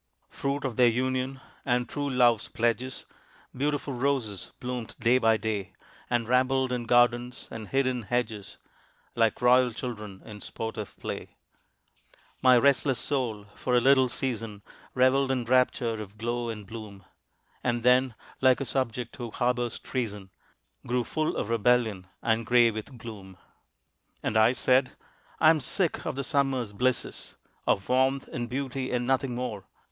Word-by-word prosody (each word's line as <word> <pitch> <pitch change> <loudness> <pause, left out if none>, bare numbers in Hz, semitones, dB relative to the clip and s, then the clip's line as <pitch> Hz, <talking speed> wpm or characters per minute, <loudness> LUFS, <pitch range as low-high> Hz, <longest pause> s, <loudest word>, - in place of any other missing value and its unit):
Fruit 140 +1 -2
of 125 -5 -3
their 125 - +6
union 130 +2 0 0.2
and 125 -1 +1
true 145 +2 -3
love's 120 -4 +3
pledges, 120 +3 -1 0.5
Beautiful 145 +1 -1
roses 125 -6 -1
bloomed 125 -2 -5
day 120 +2 +4
by 115 -2 +4
day, 105 -3 -3 0.4
And 120 -2 0
rambled 130 +1 +2
in 120 -1 -2
gardens 120 +1 +2
and 110 -2 -7
hid 135 0 +1
in 125 -1 -1
hedges 110 -2 -3 0.6
Like 115 +1 +1
royal 125 0 +5
children 105 -5 -7
in 105 -2 -10
sportive 110 -2 -6
play. - - -6 1.1
My 130 -1 +7
restless 135 0 +3
soul 120 -7 -2
for 125 - -1
a - - +6
little 130 0 +5
season 115 -6 -4 0.3
Reveled 130 +1 +3
in 130 -2 0
rapture 120 -2 +2
of 105 0 -10
glow 120 +2 -2
and 105 -2 -6
bloom, 100 -3 -9 0.6
And 120 -2 0
then, 125 -1 +4 0.3
like 130 -1 +5
a 135 - -2
subject 125 -3 -2
who 120 -2 -5
harbors 120 0 -1
treason, 105 -7 -4 0.6
Grew 125 0 +1
full 155 +6 -2
of 105 - -2
rebellion 115 -4 +2 0.2
and 115 0 +1
gray 120 0 +5
with 110 +4 -7
gloom. 100 -5 -10 0.9
And - - -1
I 110 +3 +5
said, 130 0 +2 0.5
"I 155 0 +7
am 160 - +2
sick 170 +5 -1
of - - -2
the 140 - -2
Summer's 135 -6 0
blisses, 125 +3 -1 0.3
Of 100 - +1
warmth 130 +1 +2
and 120 -1 -4
beauty, 130 0 -3
and 125 -1 0
nothing 130 -1 0
more. 110 -6 -4
125 Hz, 150 wpm, -28 LUFS, 115-130 Hz, 1.1 s, My